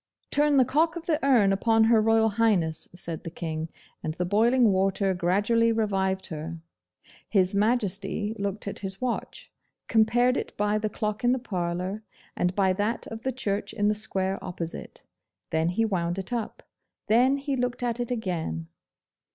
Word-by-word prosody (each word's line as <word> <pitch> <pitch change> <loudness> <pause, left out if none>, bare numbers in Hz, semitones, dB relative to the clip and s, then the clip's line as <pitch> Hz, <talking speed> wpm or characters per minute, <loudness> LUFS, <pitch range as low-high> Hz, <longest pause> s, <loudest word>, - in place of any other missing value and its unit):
'Turn 295 -1 +3
the 260 - +6
cock 320 +6 +2
of 340 -1 -6
the 320 -2 0
urn 235 -8 +4
upon 225 +3 +3
Her 225 0 +5
Royal 225 0 +4
Highness,' 200 -8 +1
said 170 -3 -4
the - - -5
King, 160 -1 -4 0.3
and 155 0 -3
the 180 - -1
boiling 230 +4 +4
water 195 0 +1
gradually 205 +6 +2
revived 195 -4 0
her. 160 +1 -6 0.7
His 190 -2 +2
Majesty 205 -1 0
looked 200 +1 -3
at 200 - -4
his 190 -1 -6
watch, 255 -2 -4 0.4
compared 240 +3 +3
it - - -5
by 210 +1 +1
the 215 0 -1
clock 210 +2 -3
in 245 +1 +4
the - - +1
parlour, 185 -3 -3 0.3
and 180 +1 0
by 190 -2 +3
that 210 +5 -1
of 225 0 -6
the 265 - -1
church 210 -5 -2
in 205 -1 +1
the - - +3
square 195 -2 -2
opposite; 170 -2 -6 0.5
then 160 +1 +1
he 225 +6 +1
wound 175 -4 -1
it 195 +5 -4
up; 230 -3 -4 0.4
then 250 +5 +4
he 280 0 -2
looked 245 -1 -2
at 240 -1 -1
it 240 - -2
again. 165 - -3
210 Hz, 170 wpm, -27 LUFS, 185-235 Hz, 0.7 s, the